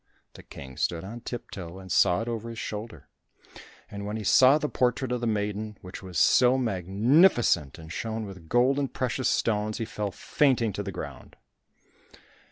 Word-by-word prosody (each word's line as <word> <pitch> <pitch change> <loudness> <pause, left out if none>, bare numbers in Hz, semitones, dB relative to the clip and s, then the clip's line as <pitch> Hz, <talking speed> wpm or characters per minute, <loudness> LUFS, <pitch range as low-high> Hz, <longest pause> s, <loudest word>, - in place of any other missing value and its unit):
The - - -12
King 65 -2 -11
stood 85 -1 -1
on 115 +5 -8
tip 120 0 -7
toe 90 -1 -8
and 95 -1 -10
saw 95 +3 +3
it - - -8
over 115 -1 -4
his 115 - -8
shoulder. 105 - -6 0.8
And 100 0 -7
when 105 +2 -4
he 110 - -5
saw 130 +7 +6
the 150 - -2
portrait 125 -1 0
of 125 -1 -1
the 120 - -1
maiden, 105 0 -2
which 90 0 -9
was 90 -3 -7
so 125 - +5
magnificent 110 - +3
and 80 0 -10
shone 110 -1 -3
with 90 -5 -11
gold 125 +3 +3
and 140 -2 -2
precious 130 0 -1
stones, 105 -1 0
he 115 - -3
fell 105 -2 -3
fainting 120 +1 +1
to 100 - -3
the 100 -1 -5
ground. - - -8
110 Hz, 180 wpm, -27 LUFS, 95-120 Hz, 0.8 s, saw